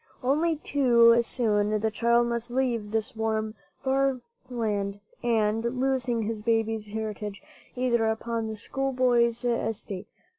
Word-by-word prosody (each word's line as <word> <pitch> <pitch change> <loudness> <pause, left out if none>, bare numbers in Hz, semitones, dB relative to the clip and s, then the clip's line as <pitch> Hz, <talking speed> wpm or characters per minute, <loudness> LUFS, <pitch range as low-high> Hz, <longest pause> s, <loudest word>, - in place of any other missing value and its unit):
Only 310 +6 +2
too 235 -6 +4
soon 215 -3 +1
the 220 +1 0
child 235 +2 +3
must 235 0 -3
leave 240 -4 -1
this 220 +3 -2
warm, 220 -1 -1 0.3
fair 270 -1 +1 0.3
land, 205 -4 -2 0.2
and, 225 -2 +1 0.2
losing 255 -3 +1
his 215 0 -3
baby's 225 -1 0
heritage, 210 +1 -5 0.3
enter 235 -3 +2
upon 225 0 -2
the 220 - -4
schoolboy's 245 -1 +1
estate. 220 -5 -2
230 Hz, 120 wpm, -27 LUFS, 220-245 Hz, 0.3 s, too